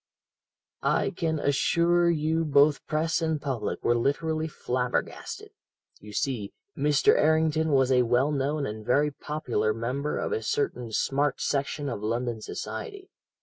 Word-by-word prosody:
"I - - +1
can 160 -2 -1
assure 170 +4 +2
you 160 0 +1
both 145 -1 +4
press 160 +2 0
and 160 -2 0
public 135 -6 -3
were 120 - +3
literally 155 +6 0
flabbergasted. 125 -4 -3 0.5
You 105 - -12
see, 110 -2 -2 0.2
Mr. 145 -1 +3
Errington 160 0 +2
was 135 -2 +3
a 125 -1 +5
well 125 +4 +2
known 145 +1 -1
and 110 -1 -5
very 145 +6 +2
popular 120 -8 -2
member 130 +6 -2
of - - -2
a 445 0 -1
certain 415 - -2
smart 140 +4 0
section 145 +1 -1
of 115 -6 -4
London 115 +1 -2
society. 400 - -7
145 Hz, 140 wpm, -27 LUFS, 125-160 Hz, 0.5 s, a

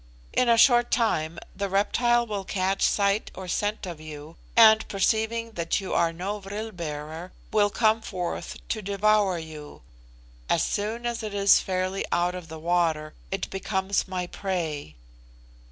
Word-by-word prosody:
In 250 - +3
a 230 - +5
short 240 0 +6
time 170 -9 +1 0.2
the 200 -1 -2
reptile 240 +5 +2
will 205 -3 -4
catch 190 0 -1
sight 200 +1 +2
or 185 0 -7
scent 205 +4 -1
of 170 -4 -7
you, 155 +1 -9 0.2
and 220 -1 +7
perceiving 220 +3 0
that 170 -4 -1
you 195 - -5
are 170 -1 +3
no 190 +5 -4
vril 205 +3 -6
bearer, 160 0 -6 0.2
will 205 -1 +3
come 220 +1 +2
forth 180 -5 -4
to 220 - -1
devour 200 -1 +2
you. 155 - -9 0.7
As - - +3
soon 220 +4 -2
as 240 -1 -2
it 215 -2 -5
is 200 0 +6
fairly 185 +1 -2
out 175 +1 +1
of 180 -2 -7
the 160 0 -8
water, 160 -2 0 0.2
it 195 - -2
becomes 195 0 -1
my 185 -1 -3
prey." 165 - -4
195 Hz, 155 wpm, -26 LUFS, 170-215 Hz, 0.7 s, and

